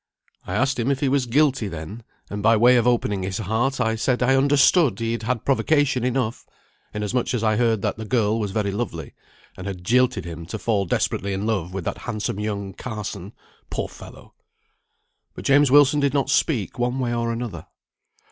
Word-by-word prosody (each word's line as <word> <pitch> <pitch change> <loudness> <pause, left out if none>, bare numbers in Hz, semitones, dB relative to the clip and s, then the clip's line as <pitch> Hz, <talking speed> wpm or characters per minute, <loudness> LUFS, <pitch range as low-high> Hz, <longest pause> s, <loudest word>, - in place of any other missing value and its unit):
I - - -3
asked 130 0 +1
him 120 +3 0
if 140 -1 0
he 140 - +1
was 135 -2 +1
guilty, 135 -2 +2
then; 90 +6 -7 0.3
and 100 0 -4
by 115 +2 +4
way 120 +3 +6
of 120 0 +2
opening 105 -5 +1
his 95 0 -3
heart 115 +6 -1
I 115 -2 +1
said 125 +3 0
I 130 +2 +3
understood 140 +1 +4
he 115 0 -1
had 115 - -3
had 115 0 -2
provocation 140 -2 +2
enough, 125 -2 -2 0.4
inasmuch 105 +4 -2
as 115 - -2
I 110 -1 +2
heard 115 -3 +1
that - - -1
the 110 - -6
girl 110 -1 +1
was 105 -2 -2
very 100 0 -1
lovely, 95 - -5 0.4
and 95 +1 -8
had 95 -2 -6
jilted 120 -3 +2
him 85 -1 -7
to 110 - -5
fall 105 -2 0
desperately 100 +2 -1
in 95 +2 -3
love 95 -6 -1
with 95 -1 -5
that - - -3
handsome 105 -1 -4
young 100 -2 -3
Carson 105 -4 -6 0.4
(poor - - -3
fellow!). - - -14 1.0
But - - -9
James 145 0 +5
Wilson 145 +1 +5
did 140 -1 +1
not 135 -1 +1
speak 135 - 0
one 125 +1 0
way 125 -2 -1
or 115 0 -1
another. 115 -8 -5
115 Hz, 195 wpm, -23 LUFS, 100-130 Hz, 1.0 s, way